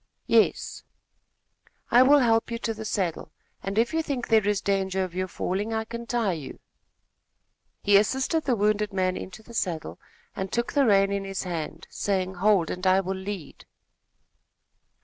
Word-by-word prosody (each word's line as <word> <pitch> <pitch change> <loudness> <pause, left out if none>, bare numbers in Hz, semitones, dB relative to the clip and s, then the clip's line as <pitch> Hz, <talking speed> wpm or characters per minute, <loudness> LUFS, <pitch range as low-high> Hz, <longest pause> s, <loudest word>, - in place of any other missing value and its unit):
"Yes." - - +2 1.1
"I 245 - +7
will 280 +3 +7
help 230 -4 +3
you 235 - -2
to 230 -1 -2
the 220 0 -8
saddle, 180 -6 -2 0.3
and, 195 +1 -4
if 235 +6 +2
you 325 - +2
think 280 -5 -3
there 220 -3 +4
is 205 -1 +2
danger 190 -1 0
of 185 -2 -6
your 185 +1 -2
falling, 200 +5 -2
I 220 0 -1
can 235 +1 -7
tie 230 -6 0
you." 150 -5 -8 1.2
He 205 0 +6
assisted 265 +9 +1
the 255 -3 +2
wounded 210 0 +1
man 185 -1 +1
into 190 +4 -8
the 235 - -14
saddle 175 -8 -3 0.4
and 190 -1 -4
took 235 0 -1
the 280 -3 +3
rein 195 -1 +4
in 200 0 -1
his 195 0 -4
hand, 165 -2 -5
saying, 190 -2 -1
"Hold, 200 -5 +3
and 180 +1 -2
I 185 +1 +5
will 190 0 -2
lead." 190 -4 -7
200 Hz, 170 wpm, -26 LUFS, 190-225 Hz, 1.2 s, I